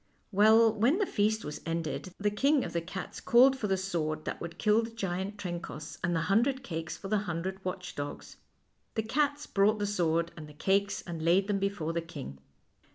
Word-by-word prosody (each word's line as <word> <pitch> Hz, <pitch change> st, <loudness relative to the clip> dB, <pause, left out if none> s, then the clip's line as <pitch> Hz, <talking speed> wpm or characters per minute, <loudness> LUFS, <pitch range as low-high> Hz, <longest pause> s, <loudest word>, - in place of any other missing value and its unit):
Well, 220 Hz, +2 st, +6 dB
when 240 Hz, -, +3 dB
the 410 Hz, -, +2 dB
feast 215 Hz, -, 0 dB
was 150 Hz, -, -6 dB
ended, 165 Hz, +2 st, -3 dB
the 205 Hz, 0 st, 0 dB
King 275 Hz, +6 st, +3 dB
of -, -, -6 dB
the 170 Hz, -, 0 dB
Cats 185 Hz, +3 st, -6 dB
called 260 Hz, +3 st, +6 dB
for 230 Hz, -5 st, -2 dB
the 190 Hz, -1 st, +1 dB
sword 160 Hz, -5 st, -2 dB
that -, -, -4 dB
would 170 Hz, 0 st, -6 dB
kill 210 Hz, +3 st, +3 dB
the 230 Hz, -, -5 dB
giant 195 Hz, -2 st, -3 dB
Trencoss, 170 Hz, -6 st, -6 dB
and 175 Hz, 0 st, +1 dB
the 165 Hz, -, +1 dB
hundred 245 Hz, -, +2 dB
cakes 160 Hz, -8 st, -4 dB
for 195 Hz, -, -7 dB
the 210 Hz, +1 st, +2 dB
hundred 190 Hz, +3 st, -3 dB
watch 180 Hz, 0 st, -4 dB
dogs. 145 Hz, 0 st, -6 dB, 0.6 s
The 220 Hz, -, 0 dB
cats 290 Hz, +5 st, 0 dB
brought 205 Hz, +2 st, +3 dB
the 205 Hz, -, -1 dB
sword 170 Hz, -4 st, +1 dB
and 155 Hz, -2 st, -9 dB
the -, -, -12 dB
cakes 200 Hz, +4 st, +1 dB
and 170 Hz, -2 st, -6 dB
laid 175 Hz, +4 st, +4 dB
them 205 Hz, -2 st, +1 dB
before 195 Hz, -5 st, -1 dB
the 170 Hz, -, 0 dB
king. 70 Hz, -, -8 dB
195 Hz, 205 wpm, -30 LUFS, 170-215 Hz, 0.6 s, Well